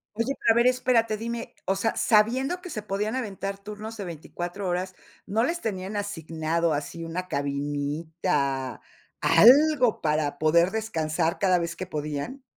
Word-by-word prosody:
Oye, 230 Hz, +5 st, -1 dB
pero 225 Hz, -, +7 dB
a -, -, +3 dB
ver, 235 Hz, +1 st, +5 dB
espérate, 245 Hz, -3 st, +2 dB
dime, 230 Hz, +2 st, -5 dB
o 195 Hz, 0 st, 0 dB
sea, 225 Hz, +3 st, 0 dB
sabiendo 255 Hz, +10 st, +2 dB
que 360 Hz, -, -8 dB
se 215 Hz, -, -4 dB
podían 210 Hz, +3 st, -2 dB
aventar 195 Hz, -5 st, -4 dB
turnos 210 Hz, +2 st, -7 dB
de 205 Hz, -, -5 dB
24 175 Hz, +3 st, -6 dB
horas, 185 Hz, +1 st, -2 dB, 0.3 s
¿no 225 Hz, +4 st, +1 dB
les 345 Hz, +3 st, -2 dB
tenían 195 Hz, -1 st, -4 dB
asignado 165 Hz, -4 st, -1 dB
así 150 Hz, +3 st, -4 dB
una 180 Hz, +2 st, -4 dB
cabinita, 145 Hz, 0 st, -2 dB, 0.4 s
algo 265 Hz, 0 st, +6 dB
para 150 Hz, -1 st, 0 dB
poder 170 Hz, +4 st, +3 dB
descansar 165 Hz, -7 st, -1 dB
cada 185 Hz, -3 st, +3 dB
vez 170 Hz, 0 st, -4 dB
que 185 Hz, -, -4 dB
podían? 150 Hz, -, -4 dB
190 Hz, 155 wpm, -26 LUFS, 160-225 Hz, 0.4 s, pero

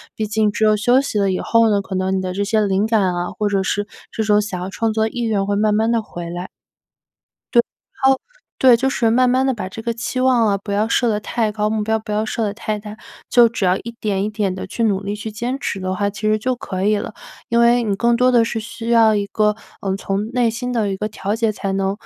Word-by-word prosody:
毕 220 Hz, -, -2 dB
竟 215 Hz, 0 st, +1 dB
只 220 Hz, -, -2 dB
有 215 Hz, 0 st, +5 dB
休 245 Hz, +5 st, +3 dB
息 220 Hz, -6 st, -2 dB
了 195 Hz, -1 st, +2 dB
以 185 Hz, -, -1 dB
后 230 Hz, -1 st, +3 dB
呢， 205 Hz, -1 st, +2 dB
可 195 Hz, -, -8 dB
能 185 Hz, +1 st, 0 dB
你 -, -, -1 dB
的 185 Hz, -1 st, -3 dB
这 200 Hz, +2 st, -1 dB
些 215 Hz, +1 st, +2 dB
灵 200 Hz, +1 st, +1 dB
感 205 Hz, -5 st, +2 dB
啊， 175 Hz, 0 st, -2 dB
或 210 Hz, -1 st, -2 dB
者 200 Hz, -1 st, +1 dB
是 205 Hz, +2 st, -1 dB, 0.2 s
这 220 Hz, -, -2 dB
种 210 Hz, -1 st, +3 dB
想 205 Hz, -3 st, -4 dB
要 180 Hz, +1 st, -4 dB
创 225 Hz, +2 st, -1 dB
作 220 Hz, 0 st, +1 dB
的 -, -, -1 dB
意 240 Hz, +1 st, -4 dB
愿 205 Hz, -3 st, 0 dB
会 200 Hz, 0 st, 0 dB
慢 210 Hz, 0 st, +2 dB
慢 220 Hz, +2 st, +2 dB
地 230 Hz, -1 st, +2 dB
回 175 Hz, -5 st, -8 dB
来。 175 Hz, +2 st, -5 dB, 1.1 s
对， 235 Hz, -, +7 dB, 0.4 s
然 265 Hz, -, +6 dB
后 265 Hz, -, +1 dB, 0.4 s
对， 255 Hz, -2 st, +6 dB
就 265 Hz, +3 st, +1 dB
是 235 Hz, -4 st, +1 dB
慢 250 Hz, +2 st, +4 dB
慢 260 Hz, +1 st, +2 dB
地 265 Hz, -, +2 dB
把 210 Hz, -6 st, -5 dB
这 225 Hz, -, -8 dB
个 235 Hz, +1 st, -2 dB
期 235 Hz, +2 st, -4 dB
望 255 Hz, -3 st, +3 dB
啊 200 Hz, -1 st, +2 dB
不 200 Hz, +1 st, -7 dB
要 210 Hz, +2 st, +1 dB
设 240 Hz, +1 st, +2 dB
得 210 Hz, -2 st, +1 dB
太 220 Hz, 0 st, -1 dB
高， 210 Hz, 0 st, -1 dB
目 215 Hz, -1 st, -1 dB
标 220 Hz, +1 st, 0 dB
不 215 Hz, -, -8 dB
要 210 Hz, +1 st, 0 dB
设 225 Hz, +1 st, -2 dB
得 210 Hz, -, 0 dB
太 215 Hz, -1 st, -3 dB
大， 210 Hz, +1 st, -9 dB, 0.3 s
就 240 Hz, -1 st, +6 dB
只 230 Hz, -3 st, -4 dB
要 180 Hz, +1 st, +3 dB
一 235 Hz, -, -7 dB
点 200 Hz, -3 st, -1 dB
一 210 Hz, -, -1 dB
点 210 Hz, -3 st, -1 dB
地 190 Hz, -, -5 dB
去 230 Hz, +5 st, -3 dB
努 200 Hz, -3 st, +1 dB
力 200 Hz, +1 st, -3 dB
去 210 Hz, +1 st, -6 dB
坚 240 Hz, +5 st, -3 dB
持 195 Hz, -, -3 dB
的 185 Hz, 0 st, -2 dB
话， 200 Hz, +2 st, 0 dB
其 205 Hz, -, -10 dB
实 215 Hz, 0 st, +2 dB
就 255 Hz, +3 st, -1 dB
可 190 Hz, -5 st, -5 dB
以 210 Hz, +1 st, +3 dB
了。 205 Hz, -, -5 dB, 0.4 s
因 235 Hz, -, +2 dB
为 235 Hz, +1 st, +4 dB
你 210 Hz, -3 st, 0 dB
更 235 Hz, +4 st, +2 dB
多 250 Hz, +1 st, +3 dB
的 240 Hz, -2 st, +5 dB
是 225 Hz, 0 st, -2 dB
需 230 Hz, +1 st, -7 dB
要 225 Hz, -2 st, +5 dB
一 205 Hz, -1 st, -1 dB
个， 210 Hz, 0 st, +1 dB, 0.3 s
嗯， 195 Hz, -3 st, -1 dB
从 195 Hz, +1 st, -2 dB
内 245 Hz, -2 st, +2 dB
心 245 Hz, +2 st, -4 dB
的 220 Hz, -4 st, 0 dB
一 195 Hz, -, -3 dB
个 210 Hz, -, -2 dB
调 205 Hz, 0 st, -3 dB
节 225 Hz, -1 st, +1 dB
才 200 Hz, -2 st, -4 dB
能， 195 Hz, 0 st, 0 dB
215 Hz, 300 characters per minute, -20 LUFS, 200-230 Hz, 1.1 s, 对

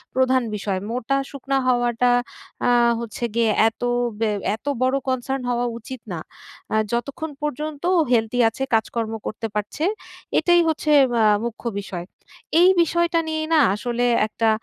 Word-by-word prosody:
প্রধান 260 Hz, -1 st, +3 dB
বিষয়। 195 Hz, -2 st, -2 dB
মোটা-শুকনা 275 Hz, +2 st, -2 dB
হওয়াটা 245 Hz, 0 st, +2 dB, 0.6 s
আ -, -, +4 dB, 0.3 s
হচ্ছে 235 Hz, +1 st, -6 dB
গিয়ে 230 Hz, -2 st, +3 dB, 0.2 s
এত 225 Hz, -, -26 dB, 0.4 s
ব্যা 225 Hz, -2 st, +1 dB, 0.2 s
এত 225 Hz, -, -19 dB, 0.2 s
বড়ো 260 Hz, +2 st, +2 dB
কনসার্ন 260 Hz, +1 st, -2 dB
হওয়া 245 Hz, 0 st, 0 dB
উচিত 255 Hz, +1 st, -9 dB
না। 165 Hz, -, -4 dB, 0.5 s
অ্যা 215 Hz, -, 0 dB
যতক্ষণ 280 Hz, +7 st, -3 dB
পর্যন্ত 300 Hz, +1 st, -4 dB
ও -, -, +5 dB
হেলদি 225 Hz, +1 st, +1 dB
আছে, 265 Hz, -, -5 dB
কাজকর্ম 225 Hz, 0 st, -1 dB
করতে 225 Hz, +1 st, -4 dB
পারছে, 210 Hz, +8 st, -3 dB, 0.6 s
এটাই 350 Hz, -1 st, +4 dB
হচ্ছে 310 Hz, -1 st, 0 dB, 0.2 s
বা 230 Hz, -2 st, +3 dB, 0.2 s
মুখ্য 235 Hz, +1 st, -6 dB, 0.2 s
বিষয়। 180 Hz, -3 st, -6 dB, 0.6 s
এই 365 Hz, -, +7 dB
বিষয়টা 340 Hz, 0 st, +1 dB
নিয়েই 315 Hz, 0 st, -2 dB
না 315 Hz, -, +6 dB, 0.2 s
আসলে 240 Hz, +2 st, -1 dB, 0.2 s
একটা 225 Hz, +1 st, 0 dB
245 Hz, 145 wpm, -22 LUFS, 225-280 Hz, 0.6 s, এই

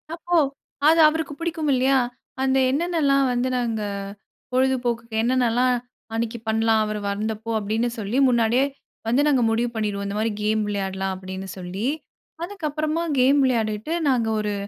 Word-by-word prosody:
அப்போ 345 Hz, +1 st, 0 dB, 0.5 s
அது 325 Hz, +1 st, +5 dB
அவருக்கு 310 Hz, -2 st, -3 dB
பிடிக்கும் 325 Hz, -3 st, -2 dB
இல்லையா, 260 Hz, +1 st, +3 dB, 0.4 s
அந்த 265 Hz, 0 st, +2 dB
என்னென்னலாம் 285 Hz, -3 st, +2 dB
வந்து 245 Hz, +1 st, 0 dB
நாங்க 230 Hz, -3 st, -1 dB, 0.7 s
பொழுதுபோக்குக்கு 245 Hz, -3 st, 0 dB
என்னென்னலாம் 250 Hz, 0 st, +2 dB, 0.4 s
அன்னைக்கு 230 Hz, 0 st, -2 dB
பண்ணலாம். 220 Hz, 0 st, +2 dB
அவர் 210 Hz, 0 st, -3 dB
வந்தப்போ 220 Hz, +2 st, -3 dB
அப்படின்னு 220 Hz, +4 st, -1 dB
சொல்லி, 215 Hz, +5 st, -2 dB
முன்னாடியே 235 Hz, +2 st, +3 dB, 0.4 s
வந்து 250 Hz, +5 st, +3 dB
நாங்க 265 Hz, -4 st, +3 dB
முடிவு 230 Hz, +2 st, +1 dB
பண்ணிருவோம். 205 Hz, -2 st, -2 dB
இந்த 200 Hz, +1 st, -3 dB
மாதிரி 225 Hz, 0 st, 0 dB
கேம் 215 Hz, 0 st, +1 dB
விளையாடலாம். 195 Hz, -1 st, -2 dB
அப்படின்னு 190 Hz, 0 st, -7 dB
சொல்லி, 185 Hz, +6 st, -4 dB, 0.6 s
அதுக்கப்புறமா 315 Hz, -3 st, -2 dB, 0.2 s
கேம் 275 Hz, +3 st, +5 dB
விளையாடிவிட்டு 220 Hz, +3 st, 0 dB, 0.2 s
நாங்க 235 Hz, -4 st, +2 dB
ஒரு 210 Hz, -1 st, -1 dB
235 Hz, 135 wpm, -23 LUFS, 215-275 Hz, 0.7 s, அது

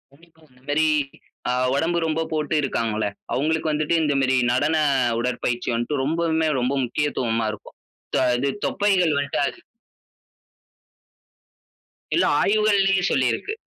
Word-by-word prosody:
இந்த 160 Hz, -4 st, -24 dB
மேரி, 150 Hz, +2 st, +2 dB, 0.6 s
ஆ -, -, +2 dB, 0.2 s
உடம்பு 165 Hz, +4 st, 0 dB
ரொம்ப 160 Hz, +1 st, -1 dB
போட்டு 155 Hz, 0 st, -1 dB
இருக்காங்கள்ல, 115 Hz, -5 st, -1 dB, 0.3 s
அவங்களுக்கு 155 Hz, +2 st, 0 dB
வந்துட்டு 150 Hz, +2 st, 0 dB
இந்த 150 Hz, -2 st, +1 dB
மேரி, 130 Hz, 0 st, +2 dB
நடன 145 Hz, +6 st, +1 dB, 0.4 s
உடற்பயிற்சி 120 Hz, 0 st, -2 dB
வந்துட்டு 120 Hz, +4 st, -1 dB
ரொம்பவுமே 160 Hz, +1 st, 0 dB
ரொம்ப 125 Hz, +2 st, 0 dB
முக்கியத்துவமா 120 Hz, -4 st, -1 dB
இருக்கும். 105 Hz, -, -12 dB, 0.4 s
தொ -, -, +3 dB, 0.2 s
இது 140 Hz, +2 st, 0 dB, 0.2 s
தொப்பைகள் 185 Hz, -6 st, +2 dB
வந்துட்டு 145 Hz, 0 st, -1 dB
அது -, -, -6 dB, 2.6 s
இல்ல -, -, +3 dB, 0.2 s
ஆய்வுகள்லயே 200 Hz, -2 st, +3 dB
சொல்லிருக்கு. 130 Hz, -, 0 dB
150 Hz, 115 wpm, -23 LUFS, 125-160 Hz, 2.6 s, தொ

